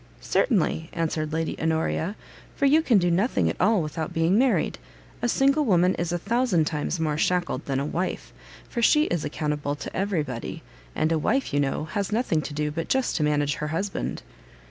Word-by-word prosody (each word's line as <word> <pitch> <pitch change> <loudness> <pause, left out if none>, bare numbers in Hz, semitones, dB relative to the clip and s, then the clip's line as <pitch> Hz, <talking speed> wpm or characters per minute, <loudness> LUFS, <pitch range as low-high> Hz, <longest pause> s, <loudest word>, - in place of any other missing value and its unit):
"Certainly," 170 - +1
answered 155 -2 -2
Lady 160 +1 -1
Honoria, 160 +4 0 0.4
"for 280 - +1
you 300 +4 +5
can 245 -9 +4
do 175 -2 +2
nothing 180 - +2
at - - -6
all 210 -5 +3
without 155 +1 -4
being 165 +3 +3
married; 255 +3 +2 0.4
a 240 - +1
single 275 +5 +3
woman 185 -6 +3
is 170 0 -2
a 175 - 0
thousand 200 -3 +1
times 155 +2 -2
more 155 -2 0
shackled 175 -6 0
than 135 -1 0
a 140 - -1
wife; 180 +5 -3 0.3
for 235 - -3
she 300 +6 +5
is 175 - -1
accountable 150 -1 -2
to - - -8
every 190 -4 0
body; 125 -5 -6 0.3
and 155 - +1
a 160 - +2
wife, 270 - 0
you 145 - +2
know, 140 +2 0
has 200 +6 -3
nothing 210 -8 +1
to 150 - -6
do 150 0 -1
but 165 +2 -4
just 265 -1 +1
to 155 - +1
manage 145 -1 +1
her 150 - -3
husband." 185 +6 -3
165 Hz, 195 wpm, -25 LUFS, 150-205 Hz, 0.4 s, you